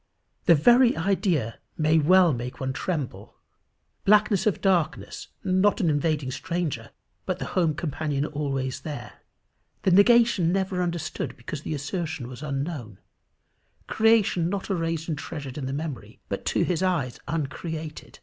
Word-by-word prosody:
The 170 Hz, -, +7 dB
very 240 Hz, -, +5 dB
idea 165 Hz, -, 0 dB, 0.2 s
may 155 Hz, +1 st, +3 dB
well 175 Hz, +1 st, +5 dB
make 125 Hz, +1 st, -5 dB
one 130 Hz, 0 st, -2 dB
tremble. 150 Hz, -3 st, -4 dB, 0.7 s
Blackness 210 Hz, 0 st, +4 dB
of 210 Hz, -, +1 dB
darkness 180 Hz, -5 st, 0 dB, 0.2 s
not 190 Hz, +4 st, +2 dB
an 170 Hz, -7 st, +2 dB
invading 145 Hz, -2 st, 0 dB
stranger, 150 Hz, -6 st, -3 dB, 0.4 s
but 185 Hz, -2 st, -1 dB
the -, -, -4 dB
home 165 Hz, -5 st, +2 dB
companion 150 Hz, -2 st, -2 dB
always 140 Hz, -4 st, -2 dB
there 150 Hz, -2 st, -7 dB, 0.6 s
the 190 Hz, -, +3 dB
negation 205 Hz, -3 st, +5 dB
never 190 Hz, -1 st, 0 dB
understood 170 Hz, -3 st, -3 dB
because 135 Hz, +4 st, -6 dB
the 155 Hz, -, -3 dB
assertion 150 Hz, -2 st, -4 dB
was 125 Hz, +1 st, -9 dB
unknown 140 Hz, -, -4 dB, 0.9 s
creation 220 Hz, -6 st, +3 dB
not 200 Hz, +1 st, -3 dB
erased 165 Hz, -3 st, -1 dB
and 155 Hz, -4 st, -2 dB
treasured 140 Hz, -6 st, -6 dB
in 140 Hz, -3 st, -4 dB
the -, -, -3 dB
memory, 145 Hz, -2 st, -5 dB
but -, -, -4 dB
to -, -, +1 dB
his 180 Hz, -2 st, 0 dB
eyes 170 Hz, -10 st, 0 dB
uncreated! 155 Hz, +1 st, -5 dB
160 Hz, 140 wpm, -26 LUFS, 145-185 Hz, 0.9 s, The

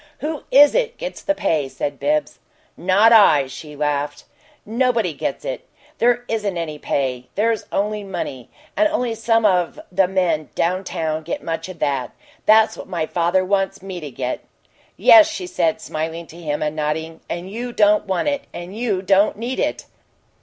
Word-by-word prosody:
"Who 305 Hz, 0 st, -4 dB
is 290 Hz, +2 st, +7 dB
it -, -, 0 dB
gets -, -, -6 dB
the 295 Hz, -, 0 dB
pay?" 150 Hz, -, 0 dB
said 145 Hz, +1 st, -4 dB
Bibbs. 300 Hz, 0 st, 0 dB, 0.4 s
"Not 200 Hz, +6 st, +4 dB
I!" 160 Hz, -11 st, +6 dB
she 145 Hz, +3 st, -10 dB
laughed. 145 Hz, 0 st, -2 dB, 0.4 s
"Nobody 230 Hz, -5 st, +1 dB
gets 140 Hz, -1 st, -4 dB
it. 130 Hz, -, -5 dB, 0.3 s
There 245 Hz, +1 st, +2 dB
isn't 210 Hz, -5 st, -2 dB
any 155 Hz, -3 st, -4 dB
pay; 125 Hz, -4 st, -2 dB
there's 220 Hz, +2 st, +1 dB
only 210 Hz, +1 st, -1 dB
money. 135 Hz, -10 st, -5 dB, 0.3 s
And 315 Hz, -, +4 dB
only 250 Hz, -7 st, -1 dB
some 225 Hz, 0 st, +1 dB
of 180 Hz, -4 st, +2 dB
the 185 Hz, 0 st, +3 dB
men 180 Hz, -6 st, 0 dB
down 185 Hz, +3 st, 0 dB
town 160 Hz, -2 st, -2 dB
get 165 Hz, +2 st, -5 dB
much 165 Hz, +2 st, -4 dB
of 185 Hz, -, -8 dB
that. 135 Hz, -5 st, -2 dB, 0.3 s
That's 220 Hz, +1 st, +5 dB
what -, -, -9 dB
my 170 Hz, -3 st, -2 dB
father 175 Hz, +3 st, +1 dB
wants 195 Hz, -1 st, -1 dB
me 190 Hz, -2 st, -6 dB
to 150 Hz, -3 st, -7 dB
get." 125 Hz, -1 st, -3 dB, 0.6 s
"Yes," 325 Hz, -2 st, +8 dB
she 325 Hz, +3 st, -5 dB
said, 215 Hz, -11 st, 0 dB
smiling 165 Hz, -2 st, -4 dB
to -, -, -12 dB
him, 150 Hz, -2 st, -2 dB
and 150 Hz, 0 st, -2 dB
nodding. 160 Hz, +1 st, -3 dB
"And 175 Hz, +3 st, -5 dB
you 240 Hz, +3 st, -4 dB
don't 210 Hz, -2 st, +3 dB
want 190 Hz, +7 st, 0 dB
it, 285 Hz, -1 st, -1 dB
and 175 Hz, +3 st, -8 dB
you 215 Hz, -5 st, -1 dB
don't 200 Hz, +2 st, +3 dB
need 240 Hz, +4 st, -3 dB
it." -, -, -1 dB
190 Hz, 175 wpm, -21 LUFS, 155-225 Hz, 0.6 s, Yes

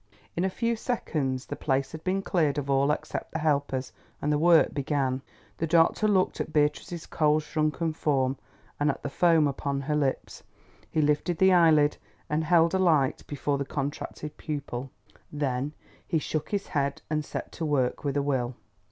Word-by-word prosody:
In 175 Hz, -, 0 dB
a 190 Hz, -, +2 dB
few 230 Hz, +4 st, -1 dB
seconds 145 Hz, -, -2 dB
the -, -, -5 dB
place 135 Hz, -1 st, -1 dB
had 160 Hz, 0 st, -8 dB
been 190 Hz, +1 st, 0 dB
cleared 155 Hz, -7 st, +1 dB
of 140 Hz, -1 st, -2 dB
all 135 Hz, +1 st, +3 dB
except 150 Hz, -, -3 dB
the -, -, 0 dB
helpers, 140 Hz, -4 st, 0 dB, 0.3 s
and 150 Hz, -, 0 dB
the 145 Hz, -, +1 dB
work 170 Hz, 0 st, +5 dB
began. 135 Hz, -2 st, -1 dB, 0.4 s
The 165 Hz, -, 0 dB
doctor 165 Hz, +6 st, +4 dB
looked 190 Hz, -3 st, +2 dB
at -, -, -5 dB
Beatrice's 150 Hz, +3 st, 0 dB
cold 155 Hz, -1 st, +2 dB
shrunken 155 Hz, +1 st, -1 dB
form, 135 Hz, -4 st, +1 dB, 0.4 s
and 145 Hz, 0 st, +2 dB
at 140 Hz, -, -3 dB
the 145 Hz, -, -3 dB
foam 165 Hz, -3 st, +4 dB
upon 140 Hz, 0 st, -2 dB
her 150 Hz, +2 st, -1 dB
lips. 140 Hz, -3 st, -1 dB, 0.5 s
He 155 Hz, -, +1 dB
lifted 150 Hz, +4 st, +1 dB
the 190 Hz, +1 st, +5 dB
eyelid, 155 Hz, -4 st, +5 dB, 0.3 s
and 155 Hz, +2 st, +1 dB
held 165 Hz, +1 st, +4 dB
a 190 Hz, -, +2 dB
light 155 Hz, -8 st, +3 dB
before 145 Hz, -1 st, -1 dB
the -, -, 0 dB
contracted 145 Hz, +1 st, -5 dB
pupil. 140 Hz, -4 st, -5 dB, 0.4 s
Then 140 Hz, -1 st, -1 dB, 0.4 s
he 165 Hz, -, +1 dB
shook 155 Hz, 0 st, -3 dB
his 200 Hz, -1 st, -2 dB
head 140 Hz, -1 st, -1 dB
and 155 Hz, 0 st, -1 dB
set -, -, -6 dB
to 165 Hz, -, -6 dB
work 130 Hz, -4 st, 0 dB
with 140 Hz, -1 st, -1 dB
a 140 Hz, -, +1 dB
will. 130 Hz, -3 st, -1 dB
150 Hz, 180 wpm, -27 LUFS, 140-165 Hz, 0.5 s, work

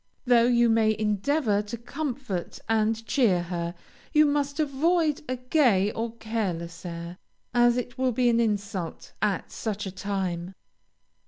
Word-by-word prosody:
Though 240 Hz, -1 st, +5 dB
you 240 Hz, -1 st, +4 dB
may 220 Hz, -1 st, +3 dB
endeavor 215 Hz, +2 st, +1 dB
to 210 Hz, +3 st, -6 dB
comfort 250 Hz, -, -4 dB
and 225 Hz, 0 st, +1 dB
cheer 210 Hz, -10 st, +2 dB
her, 170 Hz, 0 st, -4 dB, 0.4 s
you 305 Hz, 0 st, +6 dB
must 285 Hz, 0 st, 0 dB
avoid 310 Hz, +2 st, +1 dB
a 255 Hz, -, 0 dB
gay 245 Hz, -6 st, +3 dB
or 225 Hz, +1 st, -4 dB
careless 190 Hz, -7 st, -3 dB
air, 170 Hz, +1 st, -7 dB, 0.3 s
as 240 Hz, 0 st, +4 dB
it 245 Hz, 0 st, -4 dB
will 260 Hz, -1 st, +2 dB
be 245 Hz, +1 st, +2 dB
an 235 Hz, -1 st, +4 dB
insult 200 Hz, -6 st, -2 dB
at 200 Hz, -4 st, 0 dB
such 210 Hz, -2 st, -3 dB
a 190 Hz, -, -4 dB
time. 185 Hz, -2 st, -3 dB
225 Hz, 145 wpm, -26 LUFS, 195-250 Hz, 0.4 s, you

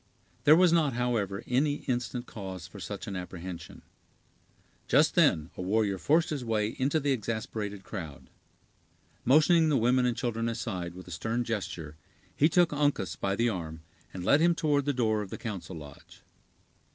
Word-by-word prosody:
There 150 Hz, -, +8 dB
was 175 Hz, 0 st, +5 dB
not, 155 Hz, -6 st, +3 dB
however, 115 Hz, -5 st, -1 dB
any 145 Hz, +4 st, 0 dB
instant 125 Hz, -1 st, -2 dB
cause 95 Hz, -7 st, -7 dB
for -, -, -11 dB
such -, -, -6 dB
an 100 Hz, -, -5 dB
apprehension. 90 Hz, -1 st, -7 dB, 1.0 s
Just -, -, +4 dB
then 80 Hz, +2 st, +3 dB
a -, -, -6 dB
warrior 100 Hz, 0 st, +1 dB
forced 160 Hz, -, +2 dB
his 145 Hz, -4 st, -2 dB
way 110 Hz, -2 st, 0 dB
into 140 Hz, +4 st, +2 dB
the 145 Hz, -1 st, 0 dB
exasperated 110 Hz, -4 st, -3 dB
crowd. 80 Hz, -10 st, -7 dB, 1.0 s
Motioning 155 Hz, +5 st, +5 dB
the 145 Hz, -, +3 dB
women 125 Hz, +2 st, +3 dB
and 120 Hz, -, -1 dB
children 115 Hz, -1 st, -1 dB
aside 90 Hz, -7 st, -4 dB
with 90 Hz, -1 st, -11 dB
a -, -, -9 dB
stern 110 Hz, +8 st, -2 dB
gesture, 90 Hz, -9 st, -4 dB, 0.4 s
he 150 Hz, -, +4 dB
took 175 Hz, -1 st, +3 dB
Uncas 145 Hz, -, 0 dB
by 100 Hz, +4 st, -1 dB
the 120 Hz, +3 st, +2 dB
arm, 80 Hz, -5 st, -5 dB, 0.3 s
and 90 Hz, -1 st, -6 dB
led 145 Hz, +8 st, +5 dB
him 170 Hz, 0 st, +4 dB
toward 145 Hz, -4 st, +1 dB
the 145 Hz, -, +2 dB
door 110 Hz, -4 st, +1 dB
of 100 Hz, -, -6 dB
the -, -, -6 dB
council 100 Hz, -6 st, -6 dB
lodge. 75 Hz, -2 st, -12 dB
115 Hz, 170 wpm, -29 LUFS, 95-140 Hz, 1.0 s, There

